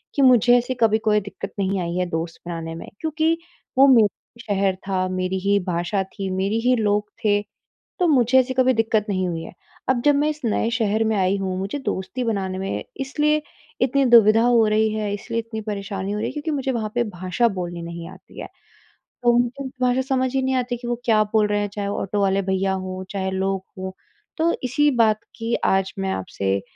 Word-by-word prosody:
कि 280 - +2
मुझे 245 -2 +6
ऐसी 245 +1 -1
कभी 220 -1 +4
कोई 210 0 +4
दिक्कत 200 0 -8
नहीं 195 0 0
आई 170 0 -3
है 180 - +1
दोस्त 165 0 -4
बनाने 165 -1 -5
में। 165 - -8
क्योंकि 320 +1 +1 0.4
वो 270 +1 +8
मेरा 235 -6 +6 0.3
शहर 195 -3 0
था, 185 -1 0
मेरी 185 0 -1
ही 200 +1 +2
भाषा 175 +3 0
थी, 195 0 -6
मेरी 195 +4 0
ही 250 +2 +3
लोग 210 -2 0 0.2
थे, 205 -1 +3 0.6
तो 360 - +3
मुझे 260 -3 +4
ऐसी 260 0 +1
कभी 260 0 +4
दिक्क़त 220 -2 +1
नहीं 185 -2 0
हुई 165 -2 -3
है। - - -9 0.4
अब 255 -2 +2
जब 290 -1 +5
मैं 295 +2 +2
इस 305 0 -6
नए 225 0 +1
शहर 225 -2 +1
में 220 -1 +1
आई 190 0 +2
हूँ, 190 -1 -2
मुझे 195 +9 -3
दोस्ती 255 -1 -3
बनाने 195 -5 -2
में 195 +1 -3 0.2
इसलिए 300 +3 +1 0.4
इतनी 270 +2 +3
दुविधा 225 -1 +7
हो 235 -2 +4
रही 215 +1 +2
है, 210 -2 -2
इसलिए 230 +3 -3
इतनी 225 -1 -6
परेशानी 200 -2 -4
हो 210 - -2
रही - - -1
है, - - -5
क्योंकि 300 +1 -4
मुझे 270 -3 -1
वहाँ 220 -3 -2
पे 240 0 +2
भाषा 185 +5 0
बोलनी 175 -1 -4
नहीं 170 0 -7
आती - - -13
है। - - -6 0.8
तो 240 - +5
उनको 245 +3 0 0.2
भाषा 250 +1 +2
समझ 260 -1 +1
ही 265 - +2
नहीं 260 0 +1
आती 245 -1 -1
कि 240 0 -8
वो 240 0 -2
क्या 215 -2 +4
बोल 215 -1 +4
रहे 205 0 0
हैं, 205 - -2
चाहे 205 -1 -3
वो - - -3
ऑटो 205 +1 -1
वाले 195 0 +2
भैया 190 0 +1
हों, 185 0 -4
चाहे 190 -1 -2
लोग 190 0 -1
हों। 190 0 -4 0.5
तो 335 +1 +2
इसी 295 +4 +2
बात 215 -1 +2 0.2
की 230 0 -3 0.2
आज 190 0 0
मैं 190 0 -1
आपसे 95 +1 -2
210 Hz, 215 wpm, -22 LUFS, 190-245 Hz, 0.8 s, वो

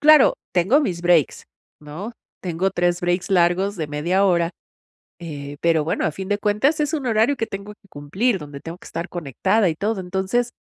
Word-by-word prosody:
Claro, 305 -2 +7 0.2
tengo 190 - +4
mis 180 - -2
breaks 175 -5 +2 0.4
¿no? 160 +10 -7 0.3
Tengo 180 +2 -1
3 175 -1 0
breaks 175 +3 -1
largos 185 +2 +2
de 160 - -3
media 170 +7 +1
hora, 170 -3 +2 0.7
eh, 145 -3 -7
pero 165 -3 +2
bueno, 160 - -1
a - - +1
fin 190 +3 -6
de 205 - +1
cuentas 210 +10 +1
es 300 +1 0
un 280 -5 -3
horario 225 +5 +2
que 225 - -2
tengo 200 +1 -7
que 200 - -27
cumplir 190 - -1
donde 145 -3 -9
tengo 165 +4 -8
que - - -15
estar 170 +3 -5
conectada 180 - +1
y 160 - -1
todo. 205 +4 -2
Entonces, 190 +6 -1
185 Hz, 190 wpm, -22 LUFS, 170-210 Hz, 0.7 s, Claro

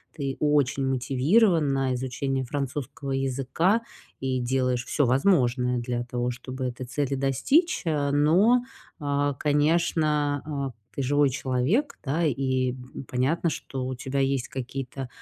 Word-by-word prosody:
Ты 140 -3 -3
очень 145 -2 +2
мотивирован 145 - +3
на 135 -1 +1
изучение 130 +1 -2
французского 140 +2 -4
языка 135 - +1 0.4
и 130 -1 -1
делаешь 125 -1 0
всё 145 - +1
возможное 125 -3 +2
для 120 0 -2
того, 125 0 -2
чтобы 130 +1 -6
этой 125 0 -5
цели 140 +1 -1
достичь. 135 - +2
А, 150 -3 +1
но, 185 +12 +4 0.4
а, 145 -1 0
конечно, 150 0 +1
а, 140 -3 -3 0.2
ты - - -3
живой 145 +1 +3
человек, 135 - 0
да? 155 +4 0
И 130 -2 0
б 125 0 -11
м, - - -10
понятно, 145 +7 0
что 135 -3 -5
у 130 0 -3
тебя 135 +2 -3
есть 135 -2 0
какие-то 130 0 -5
135 Hz, 140 wpm, -26 LUFS, 130-150 Hz, 0.4 s, но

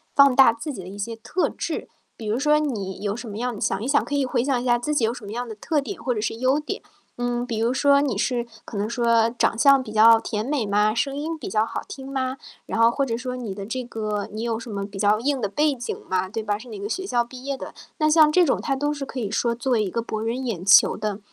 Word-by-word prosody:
放 280 -2 +6
大 265 -4 +7
自 235 +6 -6
己 190 -9 -7
的 - - -10
一 200 - -9
些 225 +3 -4
特 230 +11 -1
质。 - - -4 0.3
比 220 - -8
如 220 +3 0
说 300 +2 +3
你 210 -11 -3
有 205 0 -1
什 240 -1 -7
么 205 - -6
样 245 -1 -2
你 - - -9
想 - - 0
一 - - -3
想 285 +1 +3
可 290 - -6
以 280 -2 +2
回 250 -1 0
想 260 -3 0
一 - - -6
下 240 -1 +4
自 300 +5 -2
己 245 -6 +2
有 230 - 0
什 245 - -10
么 200 - -7
样 240 +1 -4
的 220 - -7
特 295 +8 -1
点 365 +8 -6
或 250 - +1
者 215 - -3
是 225 - -2
优 260 +5 +2
点。 300 - -5 0.4
嗯， 245 0 -1
比 225 -3 -2
如 235 +3 +1
说 280 +1 +4
你 255 -8 -1
是 240 +1 0 0.2
可 - - -9
能 210 +2 -1
说 230 -1 +3
长 230 -2 0
相 275 +1 +6
比 215 - -9
较 225 +1 +7
甜 215 -1 -3
美 275 -5 0
吗？ 210 +1 +2
声 275 +3 0
音 320 +2 -3
比 - - -6
较 215 +2 +2
好 230 - -4
听 265 -1 -8
吗？ 260 -1 -2 0.3
然 225 - -3
后 230 - +7
或 275 +2 0
者 230 -3 -2
说 250 0 -4
你 225 -6 -5
的 200 -1 -6
这 255 +3 -3
个 215 -3 -3
你 215 - -4
有 230 -1 -1
什 230 - -9
么 200 -1 -3
比 200 -1 -10
较 205 +1 +4
硬 280 0 0
的 205 - +1
背 295 +5 +2
景 245 -1 -5
吗？ 185 0 0
对 225 +1 -3
吧， 205 -1 -1
是 245 +3 -12
哪 210 - -7
个 200 - -4
学 380 +7 -3
校 240 -1 +2
毕 250 +1 -11
业 280 -1 -1
的。 - - -8 0.3
那 305 0 +3
像 305 -1 +6
这 360 +1 +5
种 270 - +1
它 275 - -1
都 290 +2 -1
是 280 -2 -5
可 260 - -6
以 205 - -2
说 235 -1 +1
作 255 +2 -3
为 220 - +3
一 190 - -2
个 230 - -2
博 220 -1 -4
人 245 +3 -2
眼 190 -6 -3
球 200 - +7
的 210 -1 -3
240 Hz, 320 characters per minute, -24 LUFS, 215-270 Hz, 0.4 s, 大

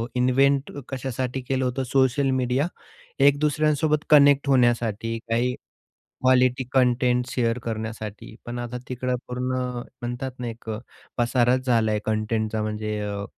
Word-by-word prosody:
Invent 135 +3 +2 0.2
कशासाठी 130 -1 -3
केलं 130 +1 -1
होतं 125 +1 -1
सोशल 135 +1 +2
मीडियावर? 130 +5 -1 0.4
या 140 - +7
एक 145 0 +4
दुसऱ्यांसोबत 150 0 +1
कनेक्ट 145 -1 +6
होण्यासाठी, 115 -3 +2
काही 120 +2 +1 0.7
क्वालिटी 130 0 +3
कंटेंट 125 -1 +3
शेअर 115 -1 0
करण्यासाठी, 110 -1 -5
पण 120 0 -5
आता 120 0 -4
तिकडे 125 0 -1
पूर्ण 125 +1 -2 0.5
म्हणतात 120 +2 -4
ना, 125 - -3
एक 115 0 -9 0.5
पसाराच 125 +1 +2
झालाय 110 -3 +2
कंटेंटचा 110 0 -1
म्हणजे 105 0 -3
अ, 100 -1 -3
125 Hz, 125 wpm, -24 LUFS, 115-130 Hz, 0.7 s, या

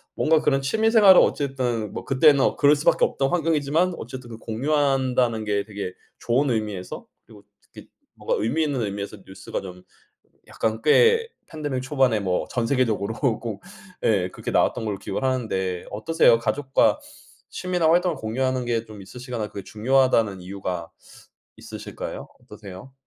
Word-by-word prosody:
뭔가 160 0 +3
그런 135 -3 +1
취미 220 +11 +1
생활은 205 -5 +8
어쨌든 125 -7 -1
뭐 - - -6
그때는 140 0 +4
그럴 145 0 +5
수밖에 145 - +2
없던 135 0 -1
환경이지만 165 +1 +1
어쨌든 120 -2 -8
공유한다는 130 -2 0
게 100 -1 -1
되게 100 -3 -6 0.3
좋은 130 +4 +1
의미에서 105 -5 -4 0.2
그리고 105 -2 -17 0.2
특히 - - -15 0.3
뭔가 - - -2
의미 145 +9 0
있는 140 -5 -1
의미에서 100 0 -4
뉴스가 95 - -6
좀 90 -1 -10 0.7
약간 110 0 -1
꽤 460 0 +4 0.2
팬데믹 145 -5 -4
초반에 130 -5 +1
뭐 90 -2 -1
전 120 -2 -1
세계적으로 115 -5 0
꼭 115 -5 -2 0.4
예 95 -5 +2
그렇게 - - -6
나왔던 - - +1
걸로 100 -2 -3
기억을 105 - -5
하는데 95 -9 -1
어떠세요? 115 +2 +3
가족과 130 +4 +1 0.5
취미나 180 -3 0
활동을 175 -1 +2
공유하는 130 +2 -2
게 115 -1 -1
좀 105 -2 -11
있으시거나 120 0 -6
그게 100 - -8
중요하다는 115 -3 +1
이유가 90 -3 -5 0.7
있으실까요? - - -8
어떠세요? 100 +5 -12
125 Hz, 360 characters per minute, -23 LUFS, 105-145 Hz, 0.7 s, 생활은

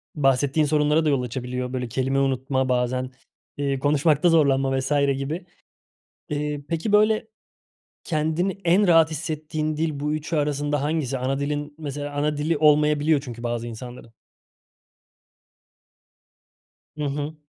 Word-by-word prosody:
bahsettiğin 140 +1 +2
sorunlara 150 +1 +2
da - - +3
yol 140 -3 +2
açabiliyor. 125 +1 -4
Böyle, 125 -1 -2
kelime 130 +3 0
unutma, 130 0 0
bazen, 125 +1 0 0.5
iii, 140 -1 -1
konuşmakta 150 +4 +3
zorlanma 135 -4 +3
vs. 130 +2 -4 0.3
gibi. 155 +6 -4 0.8
Eee, 150 0 -2
peki, 165 +5 -2
böyle, 215 +1 +3 0.8
kendini 160 +4 -1
en 185 +4 +4
rahat 165 -2 +5
hissettiğin 155 -1 -3
dil 155 -2 -2
bu 150 +1 -1
3'ü 155 +2 -3
arasında 145 -1 0
hangisi? 145 -3 -1
Ana 130 +2 -1
dilin 145 +1 -3
mesela 145 -1 -5
ana 150 +1 0
dili 150 +2 0
olmayabiliyor 150 0 +4
çünkü 120 -4 -9
bazı 120 -1 -2
insanların. 120 0 -9 2.9
Hı 150 - -3
hı. 145 +2 -3
145 Hz, 125 wpm, -24 LUFS, 135-155 Hz, 2.9 s, rahat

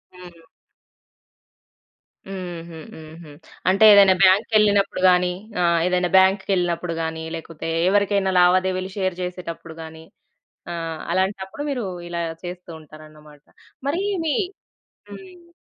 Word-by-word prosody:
హ్మ్. 175 -2 -15 1.8
హుహు. 175 -3 -8 0.2
హుహు. 160 0 -12 0.4
అంటే 195 +3 +3
ఏదైనా 195 -2 +7
బ్యాంక్‌కెళ్ళినప్పుడు 205 0 +3
గాని 180 0 +2 0.3
ఆహ్, 170 -1 +3
ఏదైనా 180 -1 0
బాంక్‌కెళ్ళినప్పుడు 185 -3 +1
గాని 160 0 -4
లేకపోతే 165 0 -7 0.2
ఎవరికైనా 200 -1 +1
లావాదేవీలు 185 +1 +2
షేర్ 185 -2 -1
చేసేటప్పుడు 175 -2 -7
గాని 160 0 -11 0.7
ఆహ్, 165 -2 -5
అలాంటప్పుడు 190 +6 -2
మీరు 250 -5 -3 0.2
ఇలా 170 0 -3 0.2
చేస్తూ 180 0 -8
ఉంటారనమాట. 155 -1 -16 0.4
మరీ 340 +7 -1 0.2
మీ 300 - +1 0.8
హ్మ్. 360 -3 -13
180 Hz, 100 wpm, -22 LUFS, 165-195 Hz, 1.8 s, ఏదైనా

